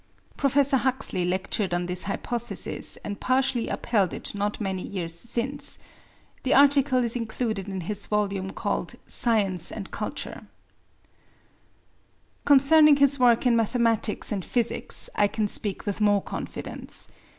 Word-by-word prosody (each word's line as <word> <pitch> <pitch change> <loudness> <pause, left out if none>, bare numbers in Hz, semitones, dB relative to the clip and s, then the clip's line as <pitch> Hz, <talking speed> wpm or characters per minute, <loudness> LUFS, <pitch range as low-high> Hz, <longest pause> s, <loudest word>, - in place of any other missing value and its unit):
Professor 275 0 +2
Huxley 255 -8 0
lectured 185 +1 -1
on 175 0 -2
this 180 0 -1
hypothesis 240 +4 -3
and 205 -1 -5
partially 255 -2 0
upheld 200 -7 0
it - - -6
not 205 0 -3
many 190 -3 -3
years 175 -4 -4
since. 245 +9 -3 0.6
The 260 - +1
article 275 -2 +4
is 235 0 +2
included 220 -4 -3
in 190 -1 -4
his 205 +4 -2
volume 200 -2 -1
called - - -3
Science 200 -7 +2
and 200 -3 -7
Culture. - - -5 2.0
Concerning 290 +2 +6
his 280 0 +3
work 240 -1 +4
in 245 -2 +4
mathematics 230 -1 0
and 200 -3 -2
physics 235 +3 +1
I 205 - +2
can 215 +1 -2
speak 205 -1 +2
with 205 0 -3
more 205 -2 +3
confidence. - - -7
220 Hz, 130 wpm, -25 LUFS, 195-255 Hz, 2.0 s, Concerning